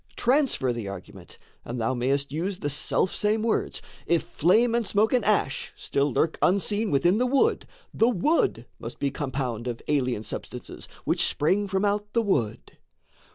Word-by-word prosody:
Transfer 250 - +2
the 115 -4 -5
argument, 100 - -10 0.3
and 120 +1 -5
thou 115 +3 0
may'st 135 +3 0
use 180 +6 -2
The 145 -6 -3
selfsame 210 +8 0
words: 230 - -1 0.2
if 170 -1 +2
flame 225 +9 +3
and 235 -3 0
smoke 215 +3 +2
and 250 -3 +3
ash 200 -10 0
Still 140 +1 -1
lurk 160 +6 0
unseen 200 +4 +2
within 175 +9 +3
the 250 - +2
wood, 270 +2 +2 0.3
the 230 - +3
wood 270 - +1
Must - - -7
be 140 -1 -1
compound 130 -5 -3
of 120 -2 -3
alien 125 -7 0
substances - - -8 0.2
Which - - +2
spring 195 +7 +1
from 195 +1 0
out 205 +1 -1
the 230 - +2
wood. 120 - -2
175 Hz, 160 wpm, -26 LUFS, 135-215 Hz, 0.3 s, flame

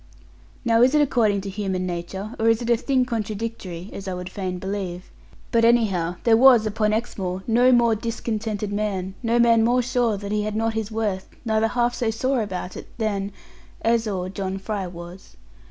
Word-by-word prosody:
Now 230 -1 +4
is 255 +4 +5
it 300 - +5
according 220 -7 +2
to 195 - -6
human 190 -2 -2
nature, 185 +4 -5
or 225 +1 +3
is 225 0 +3
it 235 - 0
a - - +6
thing 255 +2 +1
contradictory 215 -6 -4
(as 195 - -7
I 185 - -2
would 180 0 -6
fain 185 -2 -3
believe)? 190 -1 -5 0.4
But 230 0 +3
anyhow, 200 -8 +3
there 230 -1 +5
was, 240 -2 +7
upon 215 0 0
Exmoor, 190 -5 -2
no 245 +3 +4
more 235 -2 +4
discontented 220 -2 -3
man, 195 -3 -2
no 235 -1 +1
man 230 -1 +5
more 245 +2 +3
sure 240 -3 +1
that 200 0 -6
he 210 0 +1
had 210 0 -3
not 225 +1 0
his 220 -2 -2
worth, 210 -4 -2 0.2
neither 220 0 +2
half 240 +1 +1
so 240 -2 -1
sore 255 +3 0
about 185 -3 -5
it, - - -8
than, 205 -3 -1 0.5
or 230 - +4
as, 230 -1 +2 0.3
John 195 -1 -3
Fry 195 -1 -3
was. 175 +1 -11
215 Hz, 190 wpm, -23 LUFS, 195-230 Hz, 0.5 s, was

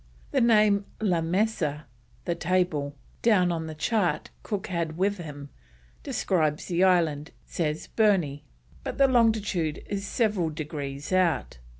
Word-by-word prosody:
The - - +2
name 210 -3 +4
La 185 -6 +1
Mesa 165 -4 0 0.4
(the 170 - 0
table) 170 -5 0 0.3
down 185 -6 +4
on 160 -1 -3
the 155 - -6
chart 175 -2 0
Cook 205 -3 -3
had 170 -4 -3
with 200 +1 +1
him, 145 -4 -8 0.5
describes 155 - 0
the 175 +1 +1
island, 165 -5 +2 0.2
says 155 -2 -2
Burney, 180 -10 +1 0.4
but - - -5
the 275 - +6
longitude 215 - +1
is 200 0 -4
several 205 -9 +1
degrees 150 -1 -5
out. 175 - +1
175 Hz, 130 wpm, -27 LUFS, 155-200 Hz, 0.5 s, the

